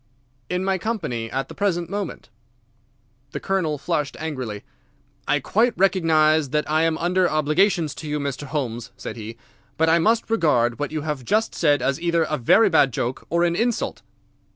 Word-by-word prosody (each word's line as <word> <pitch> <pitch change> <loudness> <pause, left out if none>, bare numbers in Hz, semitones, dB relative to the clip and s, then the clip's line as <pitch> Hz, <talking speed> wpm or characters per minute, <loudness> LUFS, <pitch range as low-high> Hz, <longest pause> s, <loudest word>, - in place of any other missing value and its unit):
"In 180 +1 -1
my 190 -1 0
company 150 - -3
at 135 +3 -3
the - - -10
present 175 -4 -1
moment." 200 - -5 1.0
The - - -3
Colonel 180 -6 -1
flushed 150 -1 -2
angrily. 130 -10 -5 0.6
"I 145 - +2
quite 225 - +1
recognise 160 -5 +3
that 150 +2 -1
I 155 +1 +2
am 160 -1 +1
under 180 +2 +1
obligations 155 +1 +2
to 155 - -7
you, 150 0 -1
Mr. 140 0 -4
Holmes," 125 -5 -3
said - - -6
he, 115 0 -8 0.4
"but 160 +1 +3
I 165 +1 +4
must 225 +5 +1
regard 125 - +2
what 145 - -2
you 155 -1 -3
have 150 -3 -4
just 215 - +1
said 145 -5 +2
as 135 +4 0
either 170 -1 +2
a 155 -2 -2
very 220 - +5
bad 155 -7 +4
joke 120 +3 -3
or 170 +1 +2
an 170 -1 +1
insult." 230 +4 -1
155 Hz, 175 wpm, -23 LUFS, 140-180 Hz, 1.0 s, very